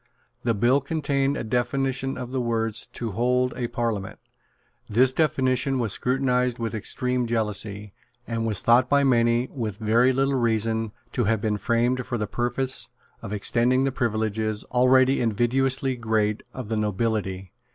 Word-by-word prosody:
The 115 Hz, -2 st, +1 dB
bill 120 Hz, +7 st, +3 dB
contained 140 Hz, -1 st, 0 dB
a -, -, -3 dB
definition 130 Hz, +3 st, -1 dB
of 125 Hz, -1 st, -6 dB
the 130 Hz, -1 st, -1 dB
words, 115 Hz, -2 st, -1 dB
"to 115 Hz, -2 st, -5 dB
hold 125 Hz, +4 st, +1 dB
a 120 Hz, -1 st, -2 dB
Parliament." 115 Hz, -5 st, -3 dB, 0.7 s
This 125 Hz, +4 st, +4 dB
definition 130 Hz, -3 st, +1 dB
was 115 Hz, -5 st, -1 dB
scrutinised 125 Hz, -1 st, 0 dB
with 115 Hz, -1 st, -3 dB
extreme 125 Hz, +3 st, -1 dB
jealousy, 105 Hz, -3 st, -2 dB, 0.3 s
and 115 Hz, -1 st, -3 dB
was 110 Hz, -3 st, 0 dB
thought 125 Hz, +2 st, +4 dB
by 140 Hz, 0 st, +4 dB
many, 120 Hz, -1 st, +3 dB
with 110 Hz, -7 st, -4 dB
very 115 Hz, +4 st, +3 dB
little 135 Hz, +1 st, +1 dB
reason, 115 Hz, -3 st, 0 dB, 0.2 s
to 120 Hz, -, 0 dB
have 110 Hz, +1 st, +1 dB
been 105 Hz, 0 st, -1 dB
framed 120 Hz, +2 st, +1 dB
for 125 Hz, -2 st, -2 dB
the 105 Hz, -, -1 dB
purpose 120 Hz, +4 st, -2 dB, 0.3 s
of 100 Hz, -, -7 dB
extending 120 Hz, +5 st, +2 dB
the 135 Hz, -, +1 dB
privileges, 110 Hz, -3 st, -1 dB
already 130 Hz, +2 st, +4 dB
invidiously 130 Hz, +4 st, +1 dB
great, 110 Hz, -2 st, 0 dB
of 125 Hz, -5 st, -7 dB
the 110 Hz, -, -1 dB
nobility. 105 Hz, -3 st, -2 dB
120 Hz, 150 wpm, -25 LUFS, 110-130 Hz, 0.7 s, This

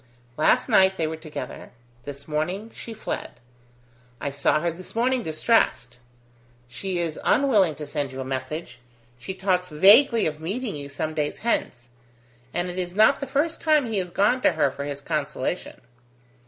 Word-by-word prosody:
"Last 155 Hz, -, +3 dB
night 190 Hz, 0 st, +5 dB
they 165 Hz, -, -1 dB
were 160 Hz, +1 st, -3 dB
together: 155 Hz, -1 st, -8 dB, 0.4 s
this 140 Hz, 0 st, -8 dB
morning 180 Hz, +9 st, -2 dB
she 230 Hz, -, -8 dB
fled. 220 Hz, -1 st, -5 dB, 0.9 s
I 140 Hz, -, -3 dB
saw 140 Hz, +2 st, +2 dB
her 170 Hz, +2 st, -1 dB
this 180 Hz, +5 st, -10 dB
morning 250 Hz, +2 st, +1 dB
distressed. 155 Hz, -, +1 dB, 0.7 s
She 180 Hz, +10 st, -4 dB
is 165 Hz, -3 st, -2 dB
unwilling 210 Hz, -, +3 dB
to 150 Hz, -, -7 dB
send 145 Hz, -1 st, -3 dB
you 130 Hz, -, -8 dB
a 130 Hz, -, -4 dB
message: 130 Hz, 0 st, -5 dB, 0.4 s
she 185 Hz, +10 st, -6 dB
talks 185 Hz, -1 st, 0 dB
vaguely 215 Hz, -, +6 dB
of 155 Hz, -1 st, -2 dB
meeting 210 Hz, +6 st, -3 dB
you 140 Hz, -1 st, -7 dB
some 155 Hz, +2 st, -3 dB
days 150 Hz, -1 st, -2 dB
hence. 120 Hz, -, -1 dB, 0.6 s
And 175 Hz, +1 st, -2 dB
it 180 Hz, +1 st, -4 dB
is 180 Hz, 0 st, -4 dB
not 220 Hz, +6 st, +5 dB
the 275 Hz, -, -4 dB
first 300 Hz, +5 st, -1 dB
time 305 Hz, -3 st, +3 dB
he 220 Hz, -4 st, -1 dB
has 180 Hz, -1 st, -3 dB
gone 205 Hz, +8 st, +2 dB
to -, -, +4 dB
her 140 Hz, -, +2 dB
for 140 Hz, +2 st, -6 dB
his 140 Hz, -1 st, -5 dB
consolation." 150 Hz, +2 st, -3 dB
175 Hz, 170 wpm, -24 LUFS, 145-215 Hz, 0.9 s, vaguely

